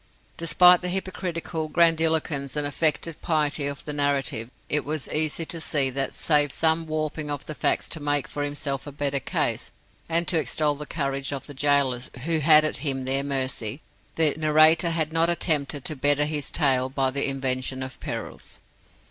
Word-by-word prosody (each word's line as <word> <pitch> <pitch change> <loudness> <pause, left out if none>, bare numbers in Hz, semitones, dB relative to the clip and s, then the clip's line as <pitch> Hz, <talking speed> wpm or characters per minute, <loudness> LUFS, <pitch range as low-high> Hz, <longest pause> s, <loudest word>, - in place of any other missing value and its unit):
Despite 180 +2 +5
the 180 - -2
hypocritical 175 -3 -4
grandiloquence 160 -4 +1
and 150 -1 -1
affected 155 +2 -1
piety 150 -3 0
of 140 -1 -6
the 150 - -4
narrative, 140 -5 -1 0.2
it 150 0 0
was 150 -1 -4
easy 155 +1 -1
to 165 0 -6
see 140 -4 +1
that, 135 +1 -2
save 145 -3 +2
some 160 +2 +1
warping 155 -1 -3
of 145 -1 -4
facts 155 - -1
to 160 - +1
make 145 -1 0
for 145 - -6
himself 145 -1 -3
a - - -6
better 140 0 -1
case, - - -2 0.4
and 170 +1 +1
to 170 - +3
extol 150 +2 +1
the 150 +1 -8
courage 140 -2 -3
of 140 -2 -4
the 145 - -9
gaolers 135 -3 +1 0.2
who 165 -1 +1
had 155 0 +6
him 135 -3 -2
at - - -6
their 135 +1 0
mercy, 130 -3 -2 0.3
the 155 -3 +4
narrator 155 +2 +5
had 160 -1 -1
not 165 +1 +2
attempted 150 -5 -1
to 155 - -3
better 145 +2 +2
his 150 -2 -3
tale 130 -4 +2
by 135 -1 0
the 140 +1 +1
invention 130 -1 -2
of 130 0 -8
perils. - - -7
145 Hz, 175 wpm, -24 LUFS, 140-160 Hz, 0.4 s, had